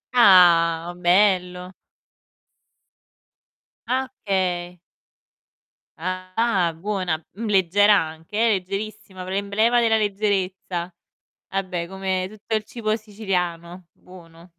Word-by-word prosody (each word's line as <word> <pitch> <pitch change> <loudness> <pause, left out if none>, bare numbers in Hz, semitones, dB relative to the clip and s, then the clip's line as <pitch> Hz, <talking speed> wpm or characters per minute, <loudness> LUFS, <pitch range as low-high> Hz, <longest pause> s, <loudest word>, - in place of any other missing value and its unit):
Ah! 175 -5 +5
Bello. 180 0 +1 2.1
Ah, 260 +1 -1 0.2
okay. 180 -3 -1 1.2
Ah, 185 +1 -1
buona, 180 -3 -3
mhmm, 225 +4 -6
leggera 205 +2 +4
anche 160 +4 -7
eh, 230 +1 +3
leggerissima, 200 0 -4
p - - -9
l'emblema 200 +5 +1
della 225 -2 +3
leggerezza. 195 -4 -2 0.6
Vabbè 185 -3 -3
come 190 0 -2
tutto 215 +2 -8
il 215 - -1
cibo 215 -1 -2
siciliano, 180 -5 -4
buono, 170 -1 -17
185 Hz, 90 wpm, -23 LUFS, 175-210 Hz, 2.1 s, Ah